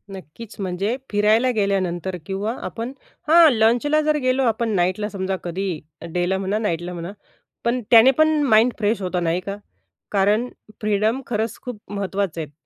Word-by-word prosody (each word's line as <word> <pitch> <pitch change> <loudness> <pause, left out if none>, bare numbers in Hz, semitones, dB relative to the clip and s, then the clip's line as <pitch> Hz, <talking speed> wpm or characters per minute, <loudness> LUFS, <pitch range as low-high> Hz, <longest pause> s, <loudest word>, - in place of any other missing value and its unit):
नक्कीच. 190 +6 -11
म्हणजे 195 +5 -1
फिरायला 215 +4 +3
गेल्यानंतर 190 -4 -1
किंवा 200 +3 -2
आपण 230 +2 -5 0.4
हां. 325 0 +7
लंचला 240 +7 +3
जर 305 0 +1
गेलो 255 +1 +1
आपण 230 -1 0
नाईटला 185 +4 0
समजा 190 -1 -3
कधी 190 +3 -3 0.4
डेला 180 +2 0
म्हणा, 195 +2 -1
नाईटला 175 -5 -2
म्हणा 175 +2 -6 0.5
पण 240 +2 +1
त्याने 235 +3 +8
पण 310 0 +5 0.2
माइंड 230 -1 +4
फ्रेश 215 0 0
होतं, 180 -1 -2
नाही 165 +2 +1
का? 200 +2 -5 0.6
कारण 210 +4 +2 0.3
फ्रीडम 215 +4 +1
खरंच 225 0 -2
खूप 245 -4 -7
महत्त्वाचे 195 -4 -2
आहेत. 150 -2 -7
210 Hz, 150 wpm, -22 LUFS, 190-235 Hz, 0.6 s, त्याने